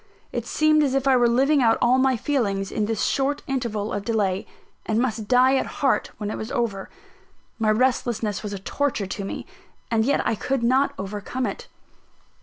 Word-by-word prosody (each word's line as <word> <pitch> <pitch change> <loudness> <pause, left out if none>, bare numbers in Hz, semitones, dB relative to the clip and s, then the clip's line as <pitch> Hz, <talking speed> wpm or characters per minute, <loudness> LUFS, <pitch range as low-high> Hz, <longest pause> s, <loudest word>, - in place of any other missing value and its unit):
It - - -4
seemed 310 0 +3
as 275 -3 +1
if 275 0 0
I 265 - +5
were 245 -1 +4
living 275 +4 +3
out 225 -2 +4
all 250 +2 +3
my 260 -1 +3
feelings 205 -8 -1
in 215 - 0
this 225 -2 -1
short 280 +1 0
interval 230 -6 -2
of 205 - -3
delay, 200 -4 -1 0.4
and 215 - -1
must 225 -4 -1
die 255 +2 +5
at - - -1
heart 275 -2 +1
when 210 -1 -4
it - - -5
was 220 - -6
over. 210 -5 -2 0.7
My 220 -1 +2
restlessness 225 -3 +1
was 210 - -5
a 200 - -4
torture 230 +2 -2
to 195 +1 -5
me; 195 - -5 0.5
and 225 -1 +3
yet 280 +4 +1
I - - +2
could 245 +4 -2
not 260 +4 +2
overcome 205 +6 -4
it. 475 - -5
235 Hz, 195 wpm, -24 LUFS, 210-265 Hz, 0.7 s, I